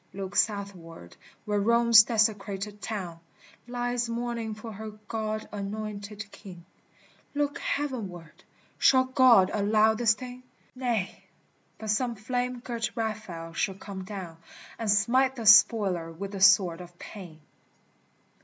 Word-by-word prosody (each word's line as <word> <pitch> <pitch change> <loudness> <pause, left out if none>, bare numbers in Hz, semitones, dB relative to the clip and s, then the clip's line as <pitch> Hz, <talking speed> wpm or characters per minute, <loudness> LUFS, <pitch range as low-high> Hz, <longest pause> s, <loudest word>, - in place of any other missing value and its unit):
Look 195 0 -6
southward 195 - -2 0.3
where 210 -1 0
Rome's 235 +1 +6
desecrated 210 -2 -1
town 185 -6 -5 0.5
Lies 245 0 -2
mourning 230 -2 -3
for 220 +1 -9
her 220 +1 -7 0.2
God 215 -1 -3
anointed 205 0 -6
King! 180 -4 -12 0.7
Look 290 +2 -1
heavenward! 205 - -4 0.4
shall 260 -1 +5
God 255 -7 +5
allow 215 +1 +3
this 225 0 +2
thing? 250 0 -9 0.3
Nay! 240 -7 -3 0.5
but 220 -1 -3
some 240 +2 0
flame 245 +3 -3
girt 235 -2 -3
Raphael 210 -7 -5
shall 190 +3 -1
come 195 -1 -8
down, 185 -4 -8 0.4
And 225 -2 -2
smite 255 +6 +3
the 230 -3 -6
Spoiler 200 -5 +5
with 195 +4 -7
the 195 -2 -6
sword 190 -3 +5
of 175 -1 -13
pain. 175 -7 -10
215 Hz, 125 wpm, -27 LUFS, 195-235 Hz, 0.7 s, Rome's